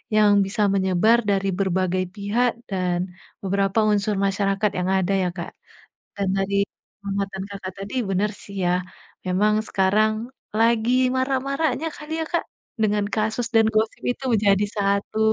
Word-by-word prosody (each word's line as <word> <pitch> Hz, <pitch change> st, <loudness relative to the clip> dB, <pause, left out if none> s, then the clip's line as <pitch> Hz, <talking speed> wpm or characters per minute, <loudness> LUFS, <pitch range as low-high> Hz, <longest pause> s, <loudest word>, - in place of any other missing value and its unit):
yang 210 Hz, -1 st, +5 dB
bisa 210 Hz, +2 st, -1 dB
menyebar 195 Hz, +4 st, +3 dB
dari 195 Hz, 0 st, +1 dB
berbagai 185 Hz, -1 st, +1 dB
pihak 225 Hz, +4 st, +1 dB, 0.2 s
dan 180 Hz, -2 st, 0 dB, 0.4 s
beberapa 195 Hz, +2 st, +1 dB
unsur 205 Hz, 0 st, +1 dB
masyarakat 195 Hz, +1 st, +1 dB
yang 180 Hz, +1 st, -1 dB
ada 190 Hz, 0 st, +1 dB
ya, 180 Hz, -, 0 dB
Kak. 170 Hz, -, -5 dB, 0.6 s
Dan 200 Hz, -1 st, -1 dB
dari 200 Hz, +1 st, +1 dB, 0.4 s
pengamatan 195 Hz, -1 st, -3 dB
Kakak 195 Hz, -2 st, -7 dB
tadi, 200 Hz, +5 st, -6 dB
bener 195 Hz, +3 st, +1 dB
sih 200 Hz, -, -11 dB
ya, 175 Hz, -, +3 dB, 0.5 s
memang 200 Hz, +4 st, +2 dB
sekarang 215 Hz, +4 st, +1 dB, 0.3 s
lagi 230 Hz, +1 st, +3 dB, 0.2 s
marak-maraknya 275 Hz, +4 st, 0 dB
kali 300 Hz, +1 st, -7 dB
ya, -, -, -1 dB
Kak, 340 Hz, -, 0 dB, 0.4 s
dengan 210 Hz, -1 st, +2 dB
kasus 220 Hz, +2 st, 0 dB
dan 225 Hz, -1 st, +6 dB
gosip 220 Hz, +1 st, +1 dB
itu 265 Hz, -, -7 dB, 0.2 s
jadi 200 Hz, +1 st, +4 dB
satu, 200 Hz, +2 st, 0 dB
200 Hz, 140 wpm, -23 LUFS, 195-220 Hz, 0.6 s, dan